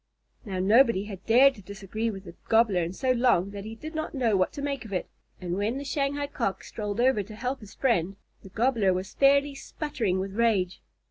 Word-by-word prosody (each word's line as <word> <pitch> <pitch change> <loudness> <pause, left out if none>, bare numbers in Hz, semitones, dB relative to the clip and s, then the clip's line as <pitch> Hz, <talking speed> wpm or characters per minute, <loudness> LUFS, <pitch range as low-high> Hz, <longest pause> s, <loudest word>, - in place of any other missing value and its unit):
Now 195 -3 -4
nobody 215 +2 +4
had 195 -3 -9
dared 260 +5 +6
to 205 - -14
disagree 200 +3 -4
with 195 -3 -7
the 170 -3 -11 0.2
Gobbler 220 -5 +4
in 165 +1 -2
so 255 +7 0
long 235 -7 +2
that 200 0 -7
he 220 +1 -7
did 310 +8 -8
not 315 -1 -4
know 235 -6 +2
what 185 -1 +2
to 285 - -6
make 280 -4 -2
of 220 - -11
it, 185 - -2 0.3
and 175 -1 -3
when 210 +6 -1
the 280 - -5
Shanghai 285 0 -1
Cock 195 -9 -3
strolled 210 0 -5
over 250 -3 +3
to 210 +2 -10
help 255 +4 -3
his 210 -2 -13
friend, 195 -8 +1 0.3
the 195 - -12
Gobbler 220 -3 +2
was 185 +2 -5
fairly 280 +1 +4
sputtering 265 - -3
with 190 +1 -4
rage. 205 -5 +1
220 Hz, 215 wpm, -27 LUFS, 195-265 Hz, 0.3 s, dared